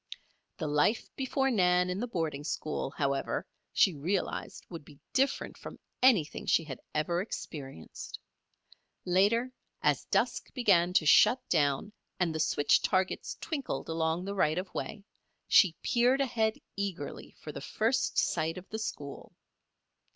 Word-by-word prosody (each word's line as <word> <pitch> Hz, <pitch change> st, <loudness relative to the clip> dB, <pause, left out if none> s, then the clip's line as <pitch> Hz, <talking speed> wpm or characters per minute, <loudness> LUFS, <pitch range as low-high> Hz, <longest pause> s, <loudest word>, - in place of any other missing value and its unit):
The -, -, -3 dB
life 150 Hz, +9 st, +1 dB
before 270 Hz, 0 st, 0 dB
Nan 180 Hz, -4 st, +3 dB
in 185 Hz, -, -3 dB
the 245 Hz, -, -2 dB
boarding 160 Hz, -, -2 dB
school, 155 Hz, -2 st, -3 dB
however, 140 Hz, -1 st, -1 dB, 0.3 s
she 190 Hz, -, +4 dB
realized 165 Hz, +7 st, -3 dB
would 165 Hz, -3 st, -8 dB
be 145 Hz, -1 st, -16 dB
different 270 Hz, +1 st, 0 dB
from -, -, -9 dB, 0.2 s
anything 220 Hz, -, +3 dB
she 165 Hz, -, +4 dB
had 135 Hz, -5 st, -7 dB, 0.2 s
ever 170 Hz, +3 st, +1 dB
experienced. 135 Hz, -, -7 dB, 0.9 s
Later, 210 Hz, +8 st, +2 dB, 0.3 s
as -, -, +2 dB
dusk -, -, 0 dB
began 185 Hz, -8 st, +4 dB
to 165 Hz, -, +3 dB
shut 245 Hz, -, +5 dB
down 145 Hz, +5 st, +1 dB, 0.3 s
and 175 Hz, -3 st, +1 dB
the 160 Hz, -, -3 dB
switch 145 Hz, -1 st, +3 dB
targets 185 Hz, 0 st, 0 dB
twinkled 285 Hz, -, -4 dB
along 160 Hz, +2 st, 0 dB
the 200 Hz, -, -3 dB
right 155 Hz, -5 st, +2 dB
of 185 Hz, 0 st, -4 dB
way, 205 Hz, -2 st, -5 dB, 0.4 s
she 175 Hz, -4 st, +6 dB
peered 250 Hz, +3 st, +3 dB
ahead 225 Hz, -5 st, +1 dB, 0.2 s
eagerly 195 Hz, -7 st, -5 dB
for -, -, -7 dB
the -, -, -7 dB
first -, -, 0 dB
sight 160 Hz, +2 st, +1 dB
of 185 Hz, -, -9 dB
the 220 Hz, -, -4 dB
school. 145 Hz, -9 st, -6 dB
180 Hz, 145 wpm, -30 LUFS, 155-220 Hz, 0.9 s, she